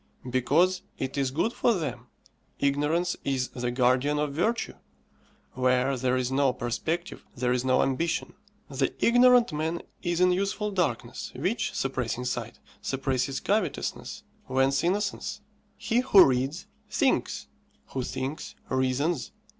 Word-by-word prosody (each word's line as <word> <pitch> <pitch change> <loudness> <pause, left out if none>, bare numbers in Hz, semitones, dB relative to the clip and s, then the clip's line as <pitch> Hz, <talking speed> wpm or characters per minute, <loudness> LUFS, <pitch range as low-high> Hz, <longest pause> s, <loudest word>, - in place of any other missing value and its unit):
because 170 +9 +3 0.2
it 130 0 -3
is 135 -2 +1
good 165 - 0
for 235 - +2
them. 130 -8 -4 0.5
Ignorance 150 +6 +1
is 130 -2 -1
the 125 -1 -3
guardian 130 +4 +2
of 150 -1 -1
Virtue. 220 +10 0 0.8
Where 130 +1 +2
there 130 0 +1
is 130 0 -1
no 135 -1 +3
perspective 160 +9 -3
there 125 0 +1
is 125 0 0
no 130 0 +3
ambition. 165 +5 -1 0.3
The - - -1
ignorant 245 -2 +5
man 160 +3 -2 0.2
is 175 0 -1
in 180 0 +5
useful 200 +3 -1
darkness, 180 -5 -2
which, - - -1
suppressing 125 - -2
sight, 120 -2 -3 0.2
suppresses 135 0 -1
covetousness: 210 -1 -2 0.2
whence 135 +1 +2
innocence. 200 +3 -1 0.4
He 235 - +1
who 210 -7 +7
reads, 135 +6 0 0.2
thinks; - - +1 0.4
who 130 - -3
thinks, 130 +4 -4
reasons. 130 +4 0
140 Hz, 130 wpm, -27 LUFS, 130-180 Hz, 0.8 s, who